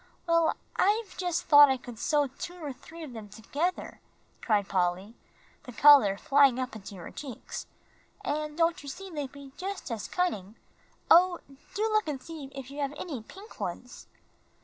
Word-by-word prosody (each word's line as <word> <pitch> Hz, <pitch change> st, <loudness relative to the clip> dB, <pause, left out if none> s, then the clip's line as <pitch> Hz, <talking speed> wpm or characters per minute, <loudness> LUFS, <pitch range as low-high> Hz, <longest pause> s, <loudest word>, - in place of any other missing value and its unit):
"Well, 335 Hz, -1 st, +3 dB, 0.2 s
I've 420 Hz, +2 st, +1 dB
just 355 Hz, -2 st, -1 dB
thought 290 Hz, -2 st, +8 dB
I 265 Hz, -, +2 dB
could 245 Hz, -2 st, -11 dB
sew 295 Hz, +2 st, +2 dB
two 280 Hz, +6 st, -7 dB
or 305 Hz, -6 st, -6 dB
three 325 Hz, +6 st, -12 dB
of 280 Hz, -5 st, -8 dB
them 215 Hz, -3 st, -9 dB
together," 285 Hz, -, -3 dB, 0.4 s
cried 205 Hz, -4 st, +1 dB
Polly, 185 Hz, +3 st, -1 dB, 0.5 s
the 250 Hz, -, -8 dB
color 245 Hz, -5 st, +7 dB
flying 275 Hz, +1 st, +4 dB
up 255 Hz, -3 st, -3 dB
into 200 Hz, -1 st, -9 dB
her 175 Hz, -, -9 dB
cheeks, 270 Hz, -6 st, -7 dB, 0.6 s
"and 300 Hz, +1 st, -2 dB
don't 335 Hz, 0 st, +2 dB
you 285 Hz, -, -8 dB
see, 385 Hz, +7 st, -8 dB
they'd 290 Hz, -4 st, -4 dB
be 280 Hz, -1 st, -12 dB
just 380 Hz, -6 st, -5 dB
as 225 Hz, -3 st, -4 dB
cunning. 220 Hz, -, -2 dB, 0.6 s
Oh, 350 Hz, +1 st, +7 dB, 0.4 s
do 420 Hz, -, 0 dB
look 430 Hz, -4 st, +2 dB
and 290 Hz, -3 st, -3 dB
see 315 Hz, +1 st, -8 dB
if 270 Hz, -1 st, -9 dB
you 285 Hz, -, -8 dB
have 280 Hz, +1 st, -2 dB
any 290 Hz, -10 st, -5 dB
pink 390 Hz, -, -14 dB
ones." -, -, -6 dB
285 Hz, 170 wpm, -29 LUFS, 240-335 Hz, 0.6 s, thought